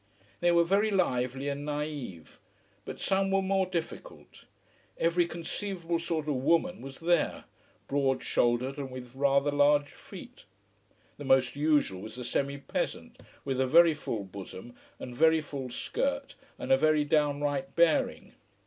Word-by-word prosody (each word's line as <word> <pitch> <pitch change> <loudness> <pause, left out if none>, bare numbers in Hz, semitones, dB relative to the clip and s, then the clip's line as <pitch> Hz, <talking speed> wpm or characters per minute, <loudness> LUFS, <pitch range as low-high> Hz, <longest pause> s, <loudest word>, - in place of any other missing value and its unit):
They 175 0 +3
were 170 0 +5
very 200 +5 +2
lively 135 - 0
and 140 0 -3
naïve. 145 - -5 0.5
But - - -7
some 195 0 +1
were 195 0 +2
more 190 0 +1
difficult. 170 -3 -7 0.5
Every 170 +1 +2
conceivable 170 0 -4
sort 165 -2 -3
of 145 -3 0
"woman" 165 +6 +1
was 135 0 -9
there, 170 +1 +1 0.4
broad 135 -2 0
shouldered 125 +5 0
and 135 -2 -4
with 125 -1 -9
rather 140 +1 +2
large 145 0 +3
feet. - - -12 0.7
The - - -6
most 130 -1 +3
usual 145 -10 +1
was 110 +2 -9
the 125 - -6
semi 140 +3 -1
peasant, 140 - -4 0.3
with 135 -1 -1
a 130 - +1
very 165 +4 +6
full 115 -8 -4
bosom 100 +3 -10 0.2
and 125 -1 -8
very 160 +3 +4
full 140 -4 -6
skirt - - -3 0.2
and - - -4
a 135 - +7
very 155 +1 +3
downright 145 +2 0
bearing. 170 -2 +2
145 Hz, 150 wpm, -29 LUFS, 130-170 Hz, 0.7 s, a